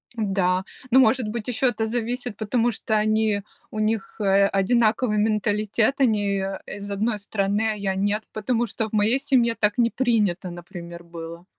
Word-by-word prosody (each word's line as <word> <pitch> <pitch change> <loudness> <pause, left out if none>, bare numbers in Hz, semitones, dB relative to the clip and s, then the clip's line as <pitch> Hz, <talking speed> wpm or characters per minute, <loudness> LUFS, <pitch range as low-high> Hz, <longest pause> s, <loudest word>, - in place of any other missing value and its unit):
Да, 190 -4 +1 0.3
ну, 260 +2 +6
может 245 -2 +3
быть, 220 +1 -5
еще 250 +2 +1
это 220 -2 -2
зависит, 240 0 -3
потому 230 +3 0
что 220 +1 -2
они 215 -1 +1 0.3
у 215 - -6
них, 215 0 -2
э, 200 -1 +4
одинаковый 215 +3 +2
менталитет, 215 +4 +1
они, 205 -5 +2
э, 195 0 -4
из 205 0 -7
одной 215 +2 0
страны, 205 +1 -1
а - - -3
я- 195 -2 -2
нет. 205 +2 0
Потому 235 +2 0
что 220 +1 -3
в - - -26
моей 220 +5 +3
семье 255 -5 +2
так 210 -2 +1
не 235 -1 +3
принято, 215 -8 0
например, 175 -1 -9
было. 170 0 -9
215 Hz, 170 wpm, -24 LUFS, 200-230 Hz, 0.3 s, ну